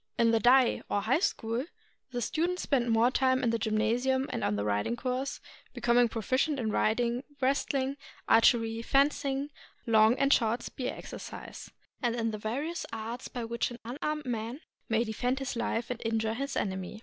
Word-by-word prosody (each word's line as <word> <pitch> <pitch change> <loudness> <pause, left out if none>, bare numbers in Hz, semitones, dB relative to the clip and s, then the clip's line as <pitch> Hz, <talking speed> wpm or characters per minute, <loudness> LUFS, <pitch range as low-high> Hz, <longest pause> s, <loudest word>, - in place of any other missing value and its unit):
In 230 -1 +4
the 225 - +3
Dai, 250 +2 +5
or 205 - +1
High 250 +8 +2
School, 235 - -1 0.5
the 245 -2 -3
students 345 +8 -1
spent 245 -4 +1
more 230 +2 +4
time 260 0 +2
in 235 - +2
the 230 - 0
gynmasium 235 +5 +1
and - - -3
on 105 - +1
the 100 0 -2
riding 105 - 0
course, 255 +2 -3 0.4
becom 240 0 +3
ing 240 - +3
proficient 255 +7 0
in 220 -3 -1
riding, 235 +4 +1 0.2
wrestling, 275 0 0 0.3
archery, 225 0 +4
fencing, 280 +2 +1 0.3
long 220 0 +5
and 275 0 +4
short 230 +1 +1
spear 255 -1 -4
exercise, - - -9 0.3
and 240 -1 +1
in 230 -1 -1
the 215 - -5
various 280 +11 -3
arts 225 +3 -5
by 245 -3 -5
which 235 +1 -1
an 240 - -8
unarmed 295 +5 -3
man 235 +3 -3 0.3
may 225 +1 +2
defend 245 +3 -1
his 270 -2 -3
life 235 0 -2
and 245 - -5
injure 225 -1 0
his 275 +4 -3
enemy. 190 +1 -3
240 Hz, 175 wpm, -30 LUFS, 225-265 Hz, 0.5 s, Dai